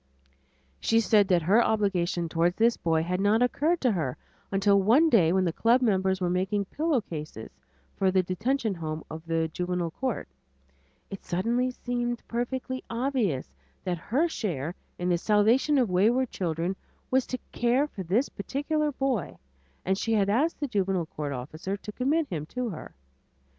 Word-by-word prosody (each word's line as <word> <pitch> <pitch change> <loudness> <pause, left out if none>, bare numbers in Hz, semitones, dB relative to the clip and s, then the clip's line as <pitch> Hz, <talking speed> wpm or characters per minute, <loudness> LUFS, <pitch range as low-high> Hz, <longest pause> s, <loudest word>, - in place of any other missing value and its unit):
She 225 - +3
said 210 -3 +4
that 180 -4 +3
her 210 +8 +5
obligation 185 -5 0
toward 170 +2 +1
this 230 +1 +4
boy 160 -1 +1
had 180 +2 -1
not 215 +4 +3
occurred 310 +7 +1
to 250 - +3
her 155 -10 -2 0.3
until 200 0 +3
one 270 +11 +4
day 170 -8 +5
when 185 0 +2
the 170 - 0
club 235 +7 +3
members 190 -5 +1
were 180 - 0
making 195 +3 0
pillowcases 190 - -3 0.5
for 190 - +2
the 185 0 +3
Detention 220 +5 -1
Home 160 -3 -5
of 160 0 -7
the 165 0 +1
Juvenile 180 0 -2
Court, 255 +3 -3 0.8
it 195 - -7
suddenly 235 +8 0
seemed 240 -1 -3
perfectly 255 +2 -3
obvious 230 - -1 0.3
that 175 -2 -2
her 275 - +1
share 175 - -3 0.2
in 175 - -2
the 175 -1 +2
salvation 225 - +3
of 245 -7 +2
wayward 230 +8 +2
children 170 +1 -2 0.4
was 260 0 +2
to 255 - -3
care 240 +4 +2
for 220 -9 -8
this 200 - +1
particular 295 +8 -2
boy 255 - -2 0.5
and 190 +1 +1
she 225 - 0
had 200 -2 +2
asked 295 +10 +1
the 290 - -1
Juvenile 195 -6 0
Court 150 -2 -5
officer 155 +9 -5
to 210 - -8
commit 290 +8 +1
him 155 -4 -4
to 250 +4 -3
her. 170 - -8
200 Hz, 165 wpm, -27 LUFS, 175-245 Hz, 0.8 s, her